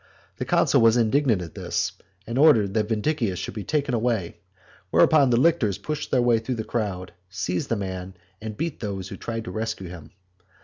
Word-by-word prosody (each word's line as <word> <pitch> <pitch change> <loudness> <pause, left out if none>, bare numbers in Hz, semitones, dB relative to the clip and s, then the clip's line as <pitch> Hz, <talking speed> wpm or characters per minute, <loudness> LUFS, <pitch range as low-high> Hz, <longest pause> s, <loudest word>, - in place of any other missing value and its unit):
The - - -3
consul - - +3
was 115 +1 +5
indignant 115 -3 +2
at 85 - -9
this, - - -2 0.3
and 115 +3 -2
ordered 115 -11 +5
that 105 -1 +1
Vindicius 115 - 0
should - - -5
be 105 -1 -5
taken 145 -1 -1
away, 115 -6 -1 0.5
whereupon 145 - +5
the 120 - +3
lictors 130 - +2
pushed 150 +9 -4
their 125 -2 +2
way 120 -2 +4
through 120 +3 -3
the 110 - -3
crowd, 100 -6 -3 0.2
seized 90 -2 -3
the 115 - +1
man, 95 -2 -5 0.3
and 110 -1 -6
beat 165 -3 -3
those 95 -3 -4
who - - -6
tried 115 -1 -5
to - - -7
rescue 110 -5 -4
him. 85 -4 -10
110 Hz, 190 wpm, -24 LUFS, 95-125 Hz, 0.5 s, was